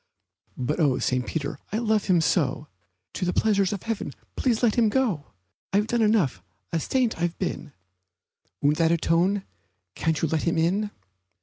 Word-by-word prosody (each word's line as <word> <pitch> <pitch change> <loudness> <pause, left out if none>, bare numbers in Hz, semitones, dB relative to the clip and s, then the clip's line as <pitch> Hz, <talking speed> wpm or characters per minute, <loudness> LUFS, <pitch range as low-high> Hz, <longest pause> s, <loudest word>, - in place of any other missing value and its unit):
But 130 +6 -1
oh, 145 -5 +3
St. 125 -1 0
Peter, 140 -3 -3
I 210 - 0
love 220 -3 +1
him 180 -4 +3
so! 150 -3 +1 0.5
To - - -4
the 180 0 0
pleasures 200 -3 +2
of 205 - -4
heaven 225 -10 -3 0.2
please 245 -3 0
let 225 -3 +4
him 230 -3 +3
go! 210 - 0 0.4
I've 205 +2 +3
done 235 +1 0
enough 195 - +2 0.3
a 165 - +2
saint 240 - 0
I've 175 0 -1
been 170 -5 -4 0.9
Won't 145 +1 +3
that 165 -1 +3
atone? 170 +4 +2 0.5
Can't 160 +6 0
you 165 - +1
let 155 0 0
him 170 -1 0
in? 190 +6 +1
175 Hz, 170 wpm, -25 LUFS, 155-215 Hz, 0.9 s, let